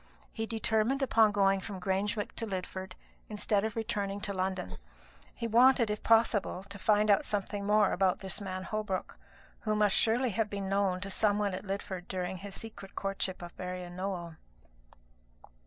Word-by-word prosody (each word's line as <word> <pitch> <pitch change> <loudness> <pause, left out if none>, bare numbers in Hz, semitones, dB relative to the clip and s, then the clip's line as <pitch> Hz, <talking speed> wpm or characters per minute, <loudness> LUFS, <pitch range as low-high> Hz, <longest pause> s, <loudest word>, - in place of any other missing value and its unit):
He 225 -1 -3
determined 225 +4 +1
upon 225 -4 +5
going 195 -1 +3
from 190 0 -6
Grangewick 200 +3 -1
to 225 - -2
Lidford, 190 -1 -5 0.4
instead 210 -1 +1
of 220 -1 -2
returning 205 -3 -2
to 200 0 -1
London. 185 -1 -2 0.6
He 235 - -4
wanted, 235 0 +5
if 210 - -3
possible, 220 -4 +3
to 200 0 -7
find 210 +1 +4
out 200 - +4
something 200 0 -2
more 210 -1 +4
about 190 +2 +2
this 190 +1 -1
man 185 -1 -4
Holbrook, 210 -2 -3 0.4
who 215 -1 -1
must 210 -2 +3
surely 240 +2 +2
have 210 +1 0
been 200 -1 -3
known 195 -2 +1
to 195 0 -3
some 205 +1 +3
one 205 -2 0
at 185 - -5
Lidford 190 -2 -4
during 185 0 -3
his 195 +1 -6
secret 215 -3 -8
courtship 195 -1 -2
of 175 - -9
Marian 180 -1 -5
Nowell. 180 -3 -4
200 Hz, 170 wpm, -31 LUFS, 190-215 Hz, 0.6 s, upon